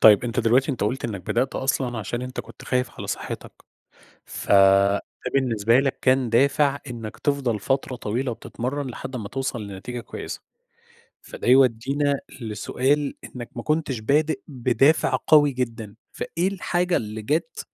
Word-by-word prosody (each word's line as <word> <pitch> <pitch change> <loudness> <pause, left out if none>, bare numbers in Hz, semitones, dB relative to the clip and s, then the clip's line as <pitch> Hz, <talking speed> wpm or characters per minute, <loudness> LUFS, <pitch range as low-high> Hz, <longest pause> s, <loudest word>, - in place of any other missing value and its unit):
طيب، 110 +2 +7
أنت 120 +1 0
دلوقتي 125 +5 +3
أنت 120 - -2
قُلت 130 +6 -2
إنّك 105 -5 -3
بدأت 120 +8 -1
أصلًا 130 -3 -1
عشان 120 +3 -3
أنت 125 +1 -4
كنت - - -13
خايف 125 0 0
على - - -5
صحتك، - - -5 0.7
فَده 100 0 +4 0.3
بالنسبة 115 -3 +3
لك 135 -1 -1
كان 130 -2 +3
دافع 140 +3 +3
إنّك 115 -2 -7
تِفضل 135 -7 0
فترة 135 +2 -1
طويلة 120 +4 -2
وبتتمرن 130 +4 -4
لحد 130 +1 -7
أمّا 110 -5 -4
توصل 130 -5 -3
لنتيجة 100 +5 -6
كويسة. 115 - -7 0.8
فده - - -7
يودّينا 135 +3 +3 0.2
لسؤال 130 +6 0
إنّك 120 -2 -8
ما 120 - -4
كُنتش 150 -6 0
بادئ 150 +5 +1
بدافع 130 +2 +2
قوي 145 -2 +6
جدًا، 115 -5 -4 0.2
فإيه 175 +3 -2
الحاجة 180 -2 0
اللي 110 0 -5
جات 160 +8 -1
125 Hz, 145 wpm, -24 LUFS, 115-140 Hz, 0.8 s, طيب